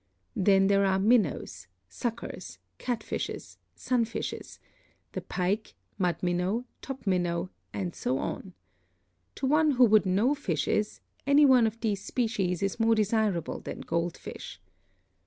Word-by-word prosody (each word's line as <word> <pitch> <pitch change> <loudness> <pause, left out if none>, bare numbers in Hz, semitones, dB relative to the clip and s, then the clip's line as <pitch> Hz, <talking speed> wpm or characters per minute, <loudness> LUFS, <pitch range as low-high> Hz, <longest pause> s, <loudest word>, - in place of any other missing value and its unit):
Then 195 0 +4
there 200 0 +4
are 190 -1 +3
Minnows, 190 - +1 0.2
Suckers, 230 - -5 0.2
Catfishes, 240 -3 -4 0.2
Sunfishes, 235 -3 -2 0.5
the - - -4
Pike, 195 +4 -2 0.2
Mud 180 -2 +2
Minnow, 180 +7 0 0.2
Top 270 -3 -7
Minnow, 175 -1 0 0.2
and 180 -4 -3
so 130 - -1
on. 185 +6 -5 0.8
To - - -3
one 305 +3 +4
who 250 -1 +6
would 215 -3 +4
know 205 +9 +3
fishes, 210 - -1 0.3
any 285 +1 +6
one 255 -4 +6
of 220 +1 -5
these 205 -4 -1
species 200 -8 -1
is 195 +3 -1
more 225 0 +4
desirable 215 -5 0
than - - -7
gold 170 +1 -2
fish. - - -9
205 Hz, 130 wpm, -28 LUFS, 180-235 Hz, 0.8 s, who